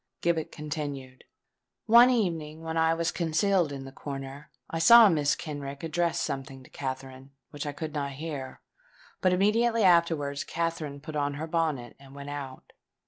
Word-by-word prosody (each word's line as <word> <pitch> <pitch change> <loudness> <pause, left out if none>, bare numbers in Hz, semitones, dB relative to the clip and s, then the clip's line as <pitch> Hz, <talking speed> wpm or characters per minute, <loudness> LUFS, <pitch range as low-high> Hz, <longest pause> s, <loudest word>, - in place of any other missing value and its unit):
Gibbet 165 -2 0
continued:— 145 -4 -6 0.6
"One 235 +3 +8
evening 165 -9 -1
when 160 0 -4
I 160 0 +3
was 170 +1 -1
concealed 170 0 +1
in 135 -1 -6
the 135 - -9
corner, 135 +1 -8 0.2
I 165 - -4
saw 230 +7 +9
Mrs. 150 -6 +2
Kenrick 140 -2 -7
address 170 +1 0
something 135 -1 -4
to - - -18
Katherine, 130 0 -6 0.2
which 145 +1 -6
I - - -2
could 155 +1 -6
not 140 -2 -3
hear; 140 -2 -6 0.6
but 185 - +3
immediately 225 +5 +2
afterwards 165 -6 +3
Katherine 160 -4 -3
put 155 +1 -8
on 145 -1 -1
her 155 +3 -4
bonnet 155 -7 -2
and 135 0 -15
went 140 0 -7
out. 140 -2 -8
150 Hz, 160 wpm, -28 LUFS, 140-165 Hz, 0.6 s, saw